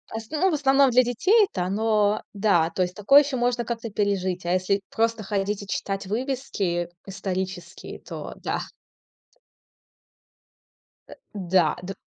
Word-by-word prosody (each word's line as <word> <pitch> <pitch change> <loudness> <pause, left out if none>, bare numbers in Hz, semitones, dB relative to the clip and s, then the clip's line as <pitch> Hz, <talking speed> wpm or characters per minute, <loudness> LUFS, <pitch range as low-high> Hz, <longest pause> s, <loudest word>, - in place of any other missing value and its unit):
асн 225 +6 -6
ну, 380 - +4
в - - -2
основном 275 -2 +4
для 250 +1 +5
детей-то 305 - +2
оно 210 +2 +1
да, 195 -6 +2
то 175 +2 -3
есть 180 0 -1
такое 275 +8 +6
ещё 275 -2 -3
можно 240 -1 0
как-то 230 -1 -4
пережить. 195 -3 -1
А 175 - +1
если 190 +2 +1
просто 225 -1 0
ходить 200 +1 -2
и 200 - -11
читать 195 0 -3
вывески 210 -7 -2 0.2
исторические, 190 -2 -5
то - - -8
да. - - -3 2.5
Э, - - -11 0.2
да. 180 -5 +2
Д. 195 +2 -5
205 Hz, 140 wpm, -24 LUFS, 185-240 Hz, 2.5 s, такое